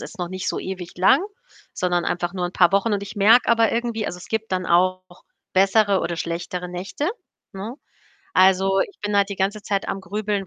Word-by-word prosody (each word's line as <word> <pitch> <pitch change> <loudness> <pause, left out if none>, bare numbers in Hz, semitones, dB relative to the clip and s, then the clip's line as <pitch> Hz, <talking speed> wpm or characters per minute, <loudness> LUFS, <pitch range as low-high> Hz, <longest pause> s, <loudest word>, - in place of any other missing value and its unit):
ist 215 - -10
noch 175 -1 -3
nicht 185 +1 -4
so - - -2
ewig 185 -2 -7
lang, 185 - +4 0.5
sondern 175 -1 0
einfach 175 0 -2
nur 180 -2 -2
'n 175 - -7
paar 180 0 +4
Wochen. 200 +3 +2
Und 200 -1 -1
ich 200 +2 -8
merke 220 +5 +5
aber 230 -1 +3
irgendwie 230 -2 -2
also, - - -4
es 180 - -11
gibt 220 -2 -3
dann 185 0 -1
auch 185 +2 +2 0.5
bessere 195 +1 +3
oder 170 - -3
schlechtere 175 +2 -4
Nächte, 190 - -3 0.4
ne? 200 +5 -6 0.6
Also, 190 +1 +4
ich 400 - -3
bin 205 0 -2
halt 200 -1 +3
die 200 - -5
ganze 200 +2 -1
Zeit 200 -1 -2
am 195 - -3
Grübeln, 200 +1 -3
195 Hz, 205 wpm, -22 LUFS, 180-210 Hz, 0.6 s, merke